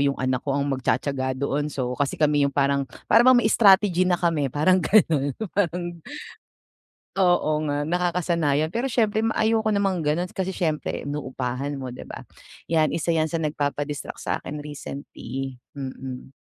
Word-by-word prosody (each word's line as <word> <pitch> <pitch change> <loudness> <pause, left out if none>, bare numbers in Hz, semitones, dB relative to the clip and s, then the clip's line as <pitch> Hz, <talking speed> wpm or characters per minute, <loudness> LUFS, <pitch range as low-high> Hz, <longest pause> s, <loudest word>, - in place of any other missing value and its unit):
yung 140 -1 0
anak 130 -1 -1
ko 140 - -1
ang 140 0 0
magtiyatiyaga 130 0 -1
doon. 140 +2 -1
So, 125 -2 -3
kasi 140 -1 -1
kami 150 -1 +3
yung 140 - 0
parang 140 0 +1 0.2
parang 240 +3 +7
may 240 - +3
strategy 195 -4 +5
na 180 -1 +1
kami 155 -7 0
parang 175 +4 +3
ganun, 155 -9 +3 0.2
parang, 180 -3 0 1.3
oo 175 -4 +3 0.2
nga 145 0 -1
nakakasanayan. 170 -3 0
Pero 250 +3 -1
siyempre 220 -2 +1
ma 225 0 0
ayoko 220 0 +2
namang 195 -4 +1
ganun 155 +4 0
kasi 190 0 -2
syempre 155 -5 -2
inuupahan 135 -1 -3
mo, 130 -2 -6
'di - - -9
ba? - - -8 0.4
Yan, 160 -2 +3
1 170 +1 0
yan 160 -1 +1
sa 165 - -1
nagpapa-distract 145 -1 -3
sa'kin 150 - -3
recently. 135 -2 -7 0.2
Mm. 130 -1 -7
150 Hz, 155 wpm, -24 LUFS, 140-180 Hz, 1.3 s, parang